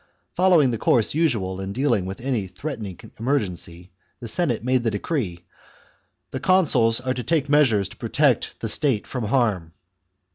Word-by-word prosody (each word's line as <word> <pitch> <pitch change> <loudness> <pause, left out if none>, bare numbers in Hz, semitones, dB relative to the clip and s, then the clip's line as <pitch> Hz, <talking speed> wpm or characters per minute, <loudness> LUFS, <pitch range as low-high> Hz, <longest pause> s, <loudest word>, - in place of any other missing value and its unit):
Following 175 -8 +4
the 115 - -3
course 115 -3 +2
usual 110 - 0
in 95 0 -5
dealing 120 -8 0
with 95 +1 -6
any 120 -7 -2
threatening 105 - -7 0.2
emergency, 90 -8 -3 0.3
the 120 - -7
Senate 120 -2 0
made 130 0 +1
the 115 - +1
decree: 105 - -3 0.4
" - - -41
The 130 - -4
consuls 130 -11 +3
are 130 0 -2
to 125 - -4
take 155 -2 0
measures 130 -10 +3
to - - -14
protect - - 0
the - - -2
state 135 -8 +1
from 125 -4 -4
harm." 105 -9 0
120 Hz, 160 wpm, -23 LUFS, 100-140 Hz, 0.4 s, Following